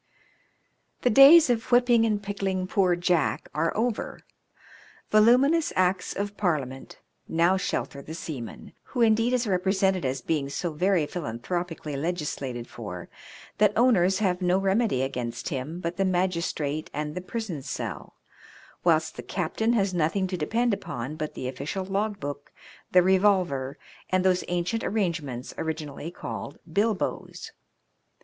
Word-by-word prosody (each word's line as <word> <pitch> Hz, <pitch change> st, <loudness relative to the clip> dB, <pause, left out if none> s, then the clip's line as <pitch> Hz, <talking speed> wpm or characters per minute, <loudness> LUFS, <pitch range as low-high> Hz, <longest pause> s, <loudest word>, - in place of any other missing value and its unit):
The 245 Hz, -, +4 dB
days 285 Hz, +8 st, +9 dB
of 230 Hz, +1 st, -2 dB
whipping 240 Hz, -2 st, +5 dB
and 210 Hz, -2 st, -1 dB
pickling 195 Hz, -2 st, -2 dB
poor 185 Hz, -2 st, +2 dB
Jack 175 Hz, -2 st, 0 dB
are 165 Hz, -, +1 dB
over. 230 Hz, 0 st, -2 dB, 0.9 s
Voluminous 255 Hz, +9 st, +5 dB
Acts 185 Hz, 0 st, +1 dB
of 205 Hz, +1 st, -3 dB
Parliament 140 Hz, -9 st, -2 dB, 0.3 s
now 170 Hz, +3 st, +3 dB
shelter 170 Hz, -6 st, -3 dB
the 160 Hz, +3 st, -8 dB
seaman, 140 Hz, -9 st, -7 dB
who, 250 Hz, -, -3 dB
indeed, 230 Hz, +1 st, +4 dB
is 250 Hz, -1 st, +1 dB
represented 190 Hz, -1 st, +1 dB
as 130 Hz, 0 st, -2 dB
being 145 Hz, -4 st, -1 dB
so 170 Hz, +4 st, -3 dB
very 180 Hz, 0 st, +2 dB
philan 145 Hz, -9 st, -5 dB
thropically 170 Hz, -2 st, -3 dB
legislated 140 Hz, -6 st, -3 dB
for, 95 Hz, -6 st, -8 dB, 0.5 s
that 210 Hz, -1 st, +4 dB
owners 195 Hz, -6 st, +4 dB
have 185 Hz, -3 st, 0 dB
no 180 Hz, 0 st, +3 dB
remedy 195 Hz, -, +1 dB
against 125 Hz, -1 st, -4 dB
him 150 Hz, +3 st, -4 dB
but 170 Hz, 0 st, -4 dB
the 195 Hz, -, +2 dB
magistrate 170 Hz, -5 st, -1 dB
and 150 Hz, 0 st, -3 dB
the 180 Hz, -, -4 dB
prison 185 Hz, -5 st, -5 dB
cell, -, -, -6 dB, 0.7 s
whilst 160 Hz, -2 st, +2 dB
the -, -, -4 dB
captain 210 Hz, +6 st, -1 dB
has 195 Hz, -4 st, +1 dB
nothing 175 Hz, +3 st, +1 dB
to 185 Hz, 0 st, -3 dB
depend 225 Hz, +8 st, 0 dB
upon 130 Hz, -6 st, -5 dB
but 155 Hz, -1 st, -5 dB
the -, -, -6 dB
oflScial 145 Hz, +9 st, -4 dB
log 200 Hz, +1 st, -1 dB
book, 145 Hz, -2 st, -6 dB, 0.4 s
the 180 Hz, -1 st, +6 dB
revolver, 185 Hz, -8 st, +2 dB, 0.3 s
and 185 Hz, 0 st, +1 dB
those 185 Hz, -1 st, +3 dB
ancient 175 Hz, +5 st, -1 dB
arrange 185 Hz, -7 st, 0 dB
ments 130 Hz, -3 st, -7 dB
originally 155 Hz, -1 st, -4 dB
called 175 Hz, -, -7 dB
bilboes. 205 Hz, +4 st, -2 dB
180 Hz, 140 wpm, -26 LUFS, 150-205 Hz, 0.9 s, days